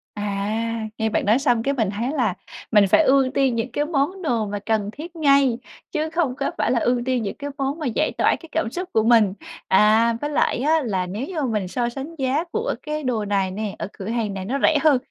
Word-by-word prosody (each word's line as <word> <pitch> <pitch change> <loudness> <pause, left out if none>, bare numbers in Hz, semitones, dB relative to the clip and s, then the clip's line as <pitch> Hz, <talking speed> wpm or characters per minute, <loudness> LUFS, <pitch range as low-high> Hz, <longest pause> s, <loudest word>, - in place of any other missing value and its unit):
À, 215 +2 -2
nghe 220 0 0
bạn - - 0
nói 215 +5 +4
xong 245 -5 +2
cái 275 - +1
mình 225 -7 0
thấy 225 +6 -2
là 245 -10 +1 0.4
mình 210 -2 +5
phải 320 - +5
ưu 270 -2 +4
tiên 265 -3 +2
những 230 +2 -2
cái 290 +4 -1
món 315 +5 -1
đồ 235 -10 0
mà 205 0 -4
cần 215 -2 0
thiết 320 +7 -9
ngay, 275 -6 +3 0.3
chứ 315 -2 -1
không 315 -6 0
có 275 0 -2
phải - - +1
là 245 - +2
ưu 245 +1 +1
tiên 255 -2 0
những 200 - -4
cái 285 0 -6
món 275 +3 -2
mà 310 - -4
giải 300 +6 0
tỏa - - +3
cái 330 - -13
cảm 315 -8 -1
xúc 360 +4 -5
của 220 - +3
mình. 225 -4 +4 0.3
À, 215 +4 +4
với 295 - -2
lại 290 - +1
á 310 +5 +2
là 190 -6 -1
nếu 205 +8 -4
như 340 -5 -3
mình 215 -7 -1
so 235 +5 -1
sánh 275 +7 -7
giá 270 +3 0
của 455 +2 -1
cái 305 -1 -3
đồ 235 -5 -1
này 195 -2 0
nè, 205 +1 -4
ở - - -3
cửa 190 - -8
hàng 225 -3 -1
này 190 -1 -5
nó 270 +7 -2
rẻ 315 - +5
hơn, 305 -4 +5
245 Hz, 245 wpm, -22 LUFS, 215-290 Hz, 0.4 s, mình